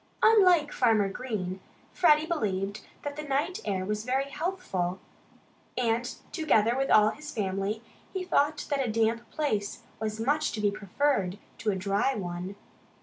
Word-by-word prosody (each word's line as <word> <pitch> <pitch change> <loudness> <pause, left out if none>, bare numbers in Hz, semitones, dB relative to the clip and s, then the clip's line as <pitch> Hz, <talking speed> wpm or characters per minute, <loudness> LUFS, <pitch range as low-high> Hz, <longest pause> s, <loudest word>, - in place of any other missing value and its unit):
Unlike 365 -9 +6
Farmer 220 -5 +3
Green, 195 -5 -4 0.3
Freddie 305 -3 +5
believed 205 - -1 0.2
that 290 0 -4
the - - -2
night 300 +7 -1
air 185 -2 -1
was 210 +1 -2
very 265 +3 0
healthful. 280 - -2 0.8
And 235 -1 +1 0.3
together 235 - +3
with 270 +1 0
all 215 0 +6
his 300 0 -9
family, 200 +1 -2 0.3
he 380 -1 -3
thought 295 -4 +1
that 280 -1 +2
a 235 - -1
damp 225 +1 +1
place 215 -10 -2 0.2
was 215 0 -3
much 290 +6 +1
to 220 - -3
be 205 -1 +2
preferred 205 -1 0 0.2
to 220 - 0
a 200 - +1
dry 200 +7 +1
one. 180 0 -4
225 Hz, 150 wpm, -28 LUFS, 200-290 Hz, 0.8 s, Unlike